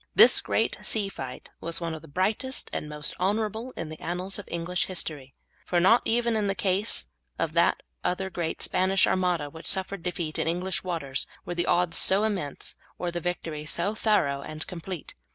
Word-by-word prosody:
This - - +8
great - - 0
sea 205 -3 +2
fight 130 -8 -7
was 170 0 0
one 165 -1 -2
of 160 - -6
the - - -13
brightest 210 - -1
and 150 - -3
most 150 0 -1
honourable 220 +5 0
in 165 -2 -4
the 155 - -8
annals 180 +4 -2
of 205 - -9
English 170 +1 -1
history, 150 -7 -4 0.3
for 175 - +1
not 210 +7 +6
even 235 0 +2
in 210 -2 +1
the 195 - 0
case 190 - +1 0.3
of - - -1
that - - +3 0.2
other 190 +1 -1
great 170 -3 -1
Spanish 190 +1 +4
Armada 180 -5 +1
which 160 +2 -8
suffered 190 -1 +1
defeat 170 -3 -3
in - - 0
English 180 +3 -1
waters 160 -7 -2 0.2
were - - -3
the 175 0 -1
odds 175 -1 +3
so 195 +2 +4
immense 190 -10 -2 0.2
or 175 -1 -2
the 175 0 -3
victory 165 -3 -3
so 170 +6 0
thorough 180 -11 +2
and 155 +2 -6
complete. 180 -1 -7
180 Hz, 190 wpm, -27 LUFS, 160-195 Hz, 0.3 s, This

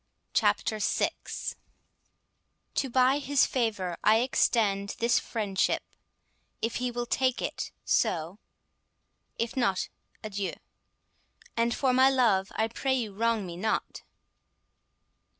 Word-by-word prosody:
CHAPTER 215 - +2
VI - - +1 1.6
To 270 - 0
buy 260 +3 +4
his 285 -1 +3
favour 210 -8 -1
I 220 +2 +5
extend 205 -5 +1
this 235 0 +3
friendship: 205 -4 -1 0.8
If 230 +1 -1
he 250 0 -1
will 240 0 -3
take 255 +1 +1
it, - - -3
so; 170 +5 0 1.0
if 230 0 -2
not, 235 -8 +1 0.3
adieu; 200 -2 -3 1.0
And, 235 0 +1
for 260 -2 +2
my 260 +1 +6
love, 220 -8 +2
I 220 - +1
pray 260 +3 -1
you 225 -6 -2
wrong 225 0 +1
me 175 -1 -7
not. 220 +4 -2
230 Hz, 115 wpm, -28 LUFS, 200-250 Hz, 1.6 s, my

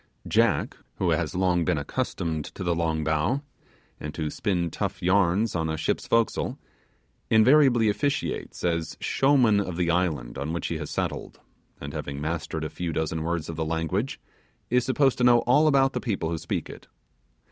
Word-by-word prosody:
Jack, - - +2 0.2
who - - 0
has - - -1
long 90 -2 +2
been 75 - +1
accustomed 80 +2 -2
to - - -7
the 85 -1 +1
long 80 -2 -1
bow, 80 - 0 0.6
and 75 0 -6
to 75 -2 -2
spin 90 -6 -1
tough - - -4
yarns 95 +3 +2
on 80 -2 0
the 80 - -1
ship's 80 - -1
forecastle, 115 -1 +1 0.7
invariably 120 0 +5
officiates 140 +7 -2
as 85 -3 -1
showman 130 -7 +3
of 90 -4 -3
the 85 -2 +1
island 80 -9 -1
on 75 +4 -3
which 85 - -3
he 80 - -3
has 75 - -5
settled, - - -4 0.4
and - - -7
having 70 0 -5
mastered 80 +1 -3
a - - -1
few 85 -2 -3
dozen 80 0 -2
words 85 -1 -2
of 85 - -6
the 80 - 0
language, 80 +9 -2 0.5
is 125 0 +3
supposed 135 +1 +2
to - - +2
know 120 -1 +6
all 145 +6 +4
about 135 -2 +4
the - - -2
people 95 -9 -2
who 85 - -1
speak - - -3
it. - - -11
85 Hz, 180 wpm, -26 LUFS, 80-115 Hz, 0.7 s, know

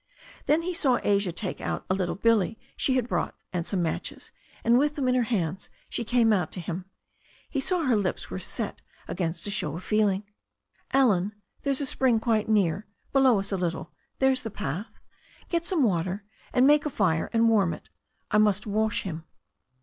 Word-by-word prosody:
Then 315 +3 +3
he 360 +1 -2
saw 265 -7 +2
Asia 200 -2 +2
take 180 +2 -4
out - - -3
a - - +1
little 185 -2 -1
billy 225 0 +2 0.2
she 260 - +1
had 250 -2 +1
brought - - -1 0.2
and 175 -2 -2
some 185 -3 0
matches, 160 - -4 0.3
and 235 +2 +5
with 295 +1 +1
them 275 -3 -1
in 250 - +3
her 250 - +3
hands 185 -5 -1 0.2
she - - -2
came 230 -1 +3
out 180 -5 0
to - - -4
him. 175 +1 -5 0.7
He 280 - 0
saw 350 +5 +1
her 255 -5 +3
lips 200 -3 -2
were - - -3
set - - -3 0.3
against 170 -2 -3
a 205 - -2
show 155 -7 -1
of 180 - -7
feeling. 210 -2 +2 0.7
"Allen, 210 -7 +3 0.3
there's 280 0 0
a - - 0
spring 255 -3 +2
quite 220 -1 +1
near, 200 -2 +2 0.3
below 265 -6 +5
us 195 +1 -3
a 195 - 0
little— 175 -2 -3 0.3
there's 265 -1 +3
the 225 - -5
path. 185 - -4 0.6
Get 340 -1 0
some 340 -6 +2
water 185 -1 0 0.3
and 250 - +4
make 295 +1 +5
a - - -1
fire 180 - +1
and 230 0 +3
warm 205 -7 +4
it - - -9 0.4
I 210 - +4
must 210 -1 +3
wash 215 0 0
him." 165 -4 -5
215 Hz, 195 wpm, -27 LUFS, 185-255 Hz, 0.7 s, and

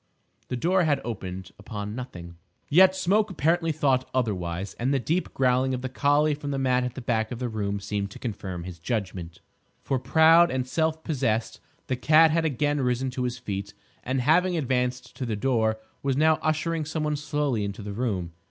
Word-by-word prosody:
The 125 - -3
door 180 +5 +2
had 145 -2 +2
opened 95 -5 -6
upon 105 0 -6
nothing. 90 -9 -8 0.3
Yet 185 +5 +6
Smoke 200 +4 +2
apparently 165 0 +1
thought 135 -4 +1
otherwise, 95 -6 -2
and 125 +3 0
the 140 - +3
deep 165 +8 -1
growling 130 0 +2
of 125 - -6
the 130 - -2
collie 145 +3 +2
from 145 0 -5
the 140 - -1
mat 130 -1 +2
at 125 -1 -4
the 130 - -7
back 110 -2 0
of 125 - -4
the 125 +1 -2
room 100 -2 -2
seemed 100 0 -3
to - - -11
confirm 95 -7 -5
his 90 -1 -8
judgment. 90 -4 -4 0.4
For, 135 - 0
proud 165 +5 +6
and 130 -1 -2
self 160 +3 0
possessed, 120 -8 -1 0.3
the 130 - -1
cat 155 +5 +5
had 165 0 +1
again 145 0 0
risen 125 +1 0
to 125 0 -2
his 125 0 -3
feet, 100 -4 -5 0.3
and 130 +1 -1
having 175 +6 +3
advanced 125 -3 -1
to 130 - -3
the 110 - -1
door, 110 -1 +1 0.2
was 135 -1 0
now 155 +1 +4
ushering 160 +1 0
some 155 +1 -3
one 150 0 0
slowly 145 -6 -1
into 100 +1 -5
the 100 0 -5
room. 100 -7 -2
130 Hz, 195 wpm, -26 LUFS, 110-155 Hz, 0.4 s, Yet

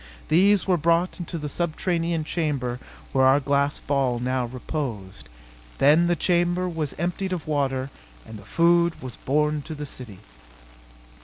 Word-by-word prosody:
These 195 +4 +4
were 185 -2 +2
brought 170 +4 +1
into 175 0 -5
the 150 -2 -4
subterranean 170 +1 -1
chamber 140 -7 -2 0.3
where 130 -1 +3
our 135 +2 +5
glass 140 0 +1
ball 135 -4 0
now 125 0 -1
reposed. 120 - -5 0.5
Then 155 +5 +5
the 175 - +2
chamber 175 +1 +1
was 160 -5 -3
emptied 180 +3 -2
of 170 -4 -4
water 135 -3 -1 0.3
and 110 -1 -10
the - - -13
food 170 +7 +2
was 130 -3 -8
borne 150 +2 0
to 155 +2 -7
the 150 0 -5
city. 125 -8 -9
150 Hz, 150 wpm, -24 LUFS, 130-170 Hz, 0.5 s, our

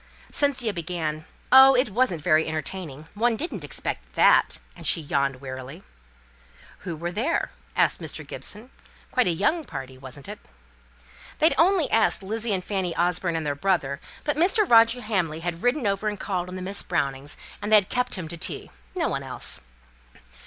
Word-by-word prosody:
Cynthia 265 -7 +1
began, 160 -3 -3 0.3
"Oh! 265 +1 +9
it 250 -3 +2
wasn't 190 - +1
very 160 -2 +3
entertaining. 155 -1 -5
One 230 +2 +1
didn't 230 - -4
expect 60 - -5
that," - - +5 0.2
and - - -5
she - - +3
yawned 140 -3 -1
wearily. 130 +5 -8 1.0
"Who 175 -4 -5
were 170 +3 -4
there?" 235 - -1 0.2
asked - - +2
Mr. - - -3
Gibson. 225 +5 -4 0.4
"Quite 250 - +2
a - - +3
young 210 - +1
party 130 - -8
wasn't 135 +1 -9
it?" - - -7 1.0
"They'd 315 - +4
only 350 -2 +3
asked 225 -3 +3
Lizzie 220 +3 -2
and 185 -2 0
Fanny 185 -3 -2
Orford, 175 0 +1
and 160 -1 -2
their 145 - 0
brother; 145 -4 0 0.2
but 295 - 0
Mr. 390 +5 +3
Roger 230 0 +5
Hamley 175 -8 -1
had 170 0 -4
ridden 245 +1 +1
over 200 +1 0
and 210 -2 -2
called 180 -3 -3
on 185 0 -6
Miss 195 +2 -2
Brownings, 140 -5 -2 0.2
and 205 +1 -3
they 215 - +9
kept 250 +6 -2
him 180 -5 -5
to 170 - -6
tea. - - -2 0.2
No - - 0
one - - -2
else." - - 0
185 Hz, 170 wpm, -25 LUFS, 155-230 Hz, 1.0 s, Oh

